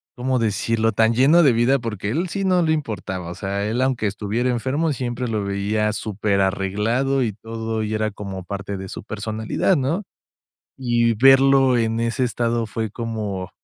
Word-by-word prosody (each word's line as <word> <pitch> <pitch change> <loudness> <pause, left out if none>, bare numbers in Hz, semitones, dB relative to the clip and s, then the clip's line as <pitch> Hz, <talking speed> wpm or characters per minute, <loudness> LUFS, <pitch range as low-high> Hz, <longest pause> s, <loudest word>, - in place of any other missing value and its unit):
¿cómo 130 +1 0
decirlo? 115 +1 0
Tan 110 +2 +3
lleno 145 +8 +5
de 140 - +6
vida, 120 +4 +3
porque 110 -4 -4
a - - -1
él 170 +6 -1
sí 195 +3 -2
no 185 -2 +3
le 160 - +2
importaba, 100 - -4
o 85 - -6
sea, 100 +1 -3
él, 120 +4 -1
aunque 130 -5 +1
estuviera 105 +5 -1
enfermo, 140 +6 0
siempre 125 0 -3
lo 110 -3 -1
veía 105 +2 0
superarreglado 105 +5 0
y 110 -3 -1
todo, 115 +1 -4
y 110 0 -3
era 110 0 0
como 95 -2 -7
parte 100 0 -5
de 95 0 -7
su - - -8
personalidad, 110 - -1
¿no? 155 +8 -1 0.8
Y 120 -2 +2
verlo 135 +1 +5
en 115 -1 0
ese 115 +3 0
estado 120 -1 0
fue 110 0 -3
como 105 -5 -4
115 Hz, 175 wpm, -22 LUFS, 105-130 Hz, 0.8 s, de